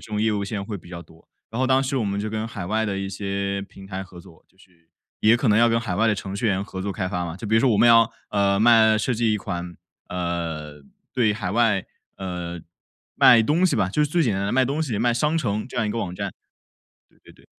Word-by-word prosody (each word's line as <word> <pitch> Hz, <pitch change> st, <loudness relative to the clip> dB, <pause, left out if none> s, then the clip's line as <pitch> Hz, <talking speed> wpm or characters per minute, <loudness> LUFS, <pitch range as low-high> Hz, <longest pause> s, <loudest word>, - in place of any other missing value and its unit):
种 105 Hz, 0 st, -1 dB
业 110 Hz, 0 st, +2 dB
务 100 Hz, -1 st, -1 dB
现 105 Hz, +1 st, -4 dB
在 100 Hz, -, -4 dB
会 105 Hz, 0 st, -5 dB
比 85 Hz, -, -14 dB
较 85 Hz, -1 st, -7 dB
多。 80 Hz, -1 st, -21 dB, 0.2 s
然 115 Hz, -, -5 dB
后 130 Hz, -, +2 dB
当 135 Hz, +1 st, +3 dB
时 135 Hz, 0 st, -2 dB
我 120 Hz, -, 0 dB
们 100 Hz, 0 st, -2 dB
就 110 Hz, -, -3 dB
跟 110 Hz, +1 st, -3 dB
海 100 Hz, -6 st, -6 dB
外 110 Hz, +3 st, 0 dB
的 100 Hz, -2 st, -2 dB
一 95 Hz, 0 st, -3 dB
些 100 Hz, 0 st, -3 dB
平 95 Hz, -1 st, -13 dB
台 95 Hz, 0 st, -5 dB
合 90 Hz, -2 st, -13 dB
作， 80 Hz, -, -18 dB
就 95 Hz, -, -34 dB
是 85 Hz, -3 st, -25 dB, 0.3 s
也 110 Hz, +2 st, +5 dB
可 120 Hz, +1 st, +1 dB
能 105 Hz, 0 st, +4 dB
要 120 Hz, -, +6 dB
跟 115 Hz, 0 st, +2 dB
海 100 Hz, -6 st, -3 dB
外 110 Hz, +5 st, +2 dB
的 105 Hz, -, +3 dB
程 95 Hz, 0 st, -6 dB
序 105 Hz, -, -4 dB
员 95 Hz, -2 st, +1 dB
合 95 Hz, -2 st, -7 dB
作 100 Hz, 0 st, -3 dB
开 95 Hz, -2 st, -3 dB
发 90 Hz, -2 st, -2 dB
嘛。 85 Hz, -1 st, -5 dB
比 110 Hz, -, +1 dB
如 -, -, +4 dB
说 130 Hz, -, +3 dB
我 105 Hz, -, +3 dB
们 120 Hz, -, +6 dB
要， 115 Hz, -1 st, +6 dB, 0.2 s
呃， 100 Hz, -1 st, +1 dB
卖 110 Hz, -1 st, +5 dB
设 120 Hz, +4 st, 0 dB
计 115 Hz, -1 st, +1 dB
一 105 Hz, -, 0 dB
款， 90 Hz, -3 st, -5 dB, 0.3 s
呃， 85 Hz, -4 st, -4 dB, 0.3 s
对 120 Hz, -5 st, +2 dB
海 105 Hz, -3 st, -4 dB
外 110 Hz, -3 st, +2 dB, 0.4 s
呃， 90 Hz, -3 st, -5 dB, 0.5 s
卖 115 Hz, -2 st, +7 dB
东 155 Hz, +9 st, +2 dB
西 185 Hz, -, +3 dB
吧， 95 Hz, -, +1 dB
就 150 Hz, +10 st, +1 dB
是 -, -, -3 dB
最 170 Hz, 0 st, +2 dB
简 115 Hz, -9 st, +1 dB
单 95 Hz, -, -2 dB
的 100 Hz, -, -1 dB
卖 130 Hz, +1 st, +3 dB
东 145 Hz, +4 st, -2 dB
西、 120 Hz, -9 st, -2 dB
卖 120 Hz, +2 st, +2 dB
商 150 Hz, +6 st, +1 dB
城 110 Hz, -5 st, -2 dB
这 -, -, -13 dB
样 110 Hz, -, +1 dB
一 -, -, -2 dB
款 115 Hz, +2 st, -2 dB
网 90 Hz, -1 st, -5 dB
站。 100 Hz, +1 st, -4 dB, 0.8 s
对 -, -, -31 dB
对 -, -, -18 dB
对。 -, -, -23 dB
105 Hz, 295 characters per minute, -23 LUFS, 95-115 Hz, 0.8 s, 卖